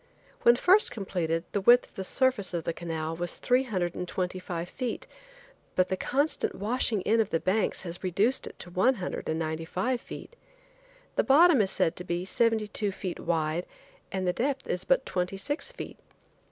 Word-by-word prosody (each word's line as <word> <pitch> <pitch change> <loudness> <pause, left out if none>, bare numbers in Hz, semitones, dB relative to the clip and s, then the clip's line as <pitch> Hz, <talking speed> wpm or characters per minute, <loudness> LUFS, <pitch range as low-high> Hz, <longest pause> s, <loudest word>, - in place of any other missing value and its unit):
When 235 - +7
first 370 - +5
completed 170 -5 -2
the 200 - 0
width 240 +5 +6
of - - -29
the 190 - -5
surface 210 -4 +1
of 170 - -2
the 170 - -2
canal 165 -1 -4
was 175 +1 -3
three 250 +2 +2
hundred 180 -7 -1
and 180 - -4
twenty 180 +1 -2
five 175 -1 -4
feet, 250 +5 -4 0.7
but 185 0 +2
the 190 - +1
constant 285 +10 0
washing 215 0 0
in 225 +4 +3
of 215 - -1
the 165 - +1
banks 195 +5 0
has 175 0 -7
reduced 200 +8 +1
it - - -10
to 175 - -7
one 200 +9 +3
hundred 185 -5 -4
and 160 - 0
ninety 160 0 -2
five 215 +9 -1
feet. 485 - -10 0.8
The - - +4
bottom 295 -1 +6
is 195 - +1
said 165 -3 +1
to 180 - -6
be 175 0 -2
seventy 225 +1 +2
two 205 0 -1
feet 185 -2 -5
wide 165 0 -1 0.4
and 190 -1 -2
the 180 - +2
depth 270 +4 -1
is 180 - -2
but 265 0 +3
twenty 180 +1 -2
six 290 - -3
feet. - - -8
190 Hz, 195 wpm, -28 LUFS, 175-240 Hz, 0.8 s, When